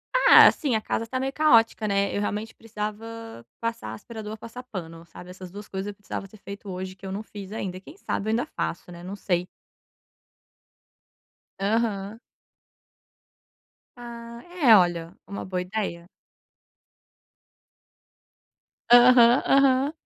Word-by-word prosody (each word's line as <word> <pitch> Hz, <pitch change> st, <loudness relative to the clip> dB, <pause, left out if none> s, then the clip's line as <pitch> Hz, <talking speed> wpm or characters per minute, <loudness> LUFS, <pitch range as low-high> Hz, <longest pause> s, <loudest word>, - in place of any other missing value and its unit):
Ah, -, -, +8 dB
assim, 270 Hz, -7 st, +1 dB
a 215 Hz, -, 0 dB
casa 230 Hz, +1 st, -3 dB
tá 255 Hz, +2 st, -3 dB
meio 270 Hz, +1 st, -2 dB
caótica, 230 Hz, -7 st, +4 dB
né. 200 Hz, 0 st, 0 dB
Eu 205 Hz, -, -1 dB
realmente 210 Hz, +2 st, -3 dB
precisava 225 Hz, -, -7 dB, 0.2 s
passar 230 Hz, -, -4 dB
aspirador 215 Hz, -, -8 dB
ou -, -, -8 dB
passar 230 Hz, +3 st, -9 dB
pano, 170 Hz, -8 st, -8 dB
sabe. 180 Hz, +2 st, -13 dB
Essas 185 Hz, 0 st, -10 dB
2 205 Hz, +1 st, -9 dB
coisas 190 Hz, +1 st, -5 dB
eu 205 Hz, -, -5 dB
precisava 200 Hz, 0 st, -7 dB
ser 215 Hz, -, -16 dB
feito 200 Hz, 0 st, -10 dB
hoje 185 Hz, 0 st, -6 dB
que 195 Hz, -, -14 dB
eu 190 Hz, -, -5 dB
não 205 Hz, +3 st, -4 dB
fiz 205 Hz, -2 st, -10 dB
ainda. 185 Hz, -4 st, -5 dB
Quem 300 Hz, -, -14 dB
sabe 215 Hz, -, -3 dB
eu -, -, 0 dB
ainda 235 Hz, +2 st, 0 dB
faço, 175 Hz, +1 st, -5 dB
né, 175 Hz, 0 st, -11 dB
não 190 Hz, +3 st, -6 dB
sei. 180 Hz, -2 st, -1 dB, 2.1 s
Aham. 210 Hz, 0 st, -1 dB, 1.8 s
Ah, 235 Hz, -1 st, -9 dB, 0.2 s
é, 230 Hz, -4 st, +9 dB
olha, 175 Hz, -1 st, +1 dB
uma 200 Hz, -, -6 dB
boa 185 Hz, -1 st, -2 dB
ideia. 180 Hz, -3 st, -4 dB, 2.8 s
Aham, 245 Hz, 0 st, +7 dB
aham. 275 Hz, +1 st, +4 dB
210 Hz, 140 wpm, -25 LUFS, 190-230 Hz, 2.8 s, é